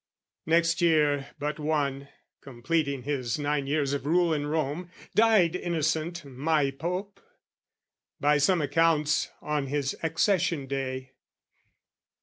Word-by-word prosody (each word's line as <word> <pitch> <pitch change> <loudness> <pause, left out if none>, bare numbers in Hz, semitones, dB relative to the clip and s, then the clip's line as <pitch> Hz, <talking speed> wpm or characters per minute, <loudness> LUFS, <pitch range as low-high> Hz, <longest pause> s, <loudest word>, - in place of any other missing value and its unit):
Next 165 +1 +2
year 150 -4 +3
but 150 +2 -3
one, 140 -3 -1 0.3
completing 140 +1 -2
his 130 -4 -2
nine 145 -1 -1
years 145 -1 0
Of 140 0 -3
rule 170 +1 +3
in 145 -1 -2
Rome, 155 +3 -2 0.2
died 210 -6 +4
Innocent 165 -1 -1
my 140 +2 0
Pope 180 +8 -5 1.0
By 150 +1 +3
some 165 +3 +3
accounts, 150 +1 +2
on 150 -2 -1
his 140 0 -1
accession 165 -2 +1
day. 130 -1 -4
150 Hz, 115 wpm, -27 LUFS, 140-165 Hz, 1.0 s, died